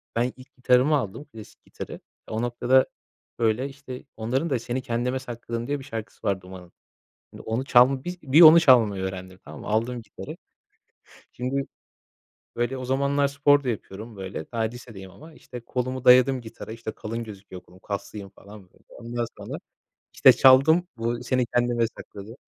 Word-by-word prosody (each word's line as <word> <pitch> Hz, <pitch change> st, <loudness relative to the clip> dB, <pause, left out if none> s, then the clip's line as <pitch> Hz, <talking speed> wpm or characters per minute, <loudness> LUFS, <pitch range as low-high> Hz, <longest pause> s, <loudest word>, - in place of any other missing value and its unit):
ben 120 Hz, +2 st, 0 dB
ilk 130 Hz, +2 st, -17 dB
gitarımı 125 Hz, +4 st, +3 dB
aldım, 130 Hz, +2 st, -3 dB
klasik 110 Hz, -7 st, -14 dB
gitarı. -, -, -9 dB, 0.3 s
O 110 Hz, +1 st, -3 dB
noktada, 120 Hz, +2 st, +3 dB, 0.5 s
böyle, 115 Hz, +4 st, +1 dB
işte, 135 Hz, -2 st, -10 dB
onların 130 Hz, +9 st, -1 dB
da, 130 Hz, -4 st, 0 dB
Seni 125 Hz, +2 st, -3 dB
Kendime 125 Hz, +1 st, -2 dB
Sakladım, 120 Hz, -1 st, -6 dB
diye 145 Hz, 0 st, -2 dB
bir -, -, -10 dB
şarkısı 110 Hz, -4 st, -7 dB
var 95 Hz, -1 st, 0 dB
Duman'ın. 90 Hz, -1 st, -12 dB, 0.6 s
Şimdi -, -, -11 dB
onu 115 Hz, +4 st, -3 dB
çalma 130 Hz, +1 st, +4 dB
biz 180 Hz, 0 st, -6 dB
bir 145 Hz, +3 st, +5 dB
onu 165 Hz, 0 st, +10 dB
çalmayı 115 Hz, -, +4 dB
öğrendim 95 Hz, -1 st, -6 dB
tamam 75 Hz, 0 st, -10 dB
mı? -, -, -9 dB
Aldım 115 Hz, +3 st, -1 dB
gitarı. 100 Hz, -, -10 dB, 0.9 s
Şimdi, 135 Hz, +3 st, -3 dB, 0.9 s
böyle, 120 Hz, +2 st, -1 dB
o 130 Hz, -, -6 dB
zamanlar 140 Hz, +2 st, +1 dB
spor 145 Hz, 0 st, +3 dB
da 125 Hz, -, -2 dB
yapıyorum, 110 Hz, 0 st, -6 dB
böyle, 95 Hz, -4 st, -6 dB
daha 115 Hz, -, -2 dB
lisedeyim 110 Hz, -4 st, -6 dB
ama 155 Hz, -, -15 dB
işte 125 Hz, -, -10 dB
kolumu 130 Hz, +2 st, -4 dB
dayadım 130 Hz, +1 st, +6 dB
gitara, 110 Hz, -1 st, -10 dB
işte, 115 Hz, -1 st, -6 dB
kalın 115 Hz, +2 st, -6 dB
gözüküyor 100 Hz, -4 st, -11 dB
kolum, 90 Hz, +1 st, -19 dB
kaslıyım 100 Hz, 0 st, -6 dB
falan, 100 Hz, +1 st, -14 dB
böyle, -, -, -27 dB
ondan 120 Hz, 0 st, -5 dB
sonra -, -, -7 dB, 0.6 s
işte -, -, +7 dB
çaldım 160 Hz, +7 st, +5 dB
bu 120 Hz, +1 st, -2 dB
Seni 125 Hz, 0 st, 0 dB
Kendime 120 Hz, -1 st, +1 dB
Sakladım. 105 Hz, +3 st, -10 dB
120 Hz, 165 wpm, -25 LUFS, 110-130 Hz, 0.9 s, onu